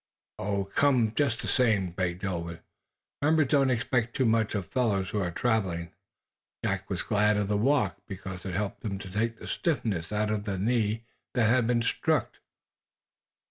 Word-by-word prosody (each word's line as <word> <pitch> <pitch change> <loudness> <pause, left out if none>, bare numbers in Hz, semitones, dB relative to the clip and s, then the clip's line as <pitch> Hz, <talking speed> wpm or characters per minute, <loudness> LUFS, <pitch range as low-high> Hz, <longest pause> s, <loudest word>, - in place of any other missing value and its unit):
"Come, 125 -6 +3
just 135 -5 0
the - - -3
same," 105 -8 +2
begged 90 +1 -2
Ulwin. 85 -3 -3 0.6
"The 145 - +2
members 155 -3 +3
don't 140 -2 +4
expect 120 -1 0
too 130 - +2
much 110 -1 +2
of 100 -3 -1
fellows 100 -3 0
who 105 - 0
are 90 -3 0
traveling." 90 -5 -1 0.7
Jack - - -1
was - - -2
glad 105 0 +2
of 105 -1 0
the 105 - +1
walk, 135 +7 +2
because 95 -2 -7
it 95 -2 -4
helped 100 +1 -2
to 100 -3 -3
take 115 +3 -1
the - - -10
stiffness 105 - -1
out 105 0 0
of 105 -1 -2
the 100 -3 -2
knee 110 +1 0 0.3
that 120 -3 +4
had 120 -2 +3
been 120 -1 +2
struck. - - 0
110 Hz, 170 wpm, -28 LUFS, 95-120 Hz, 0.7 s, don't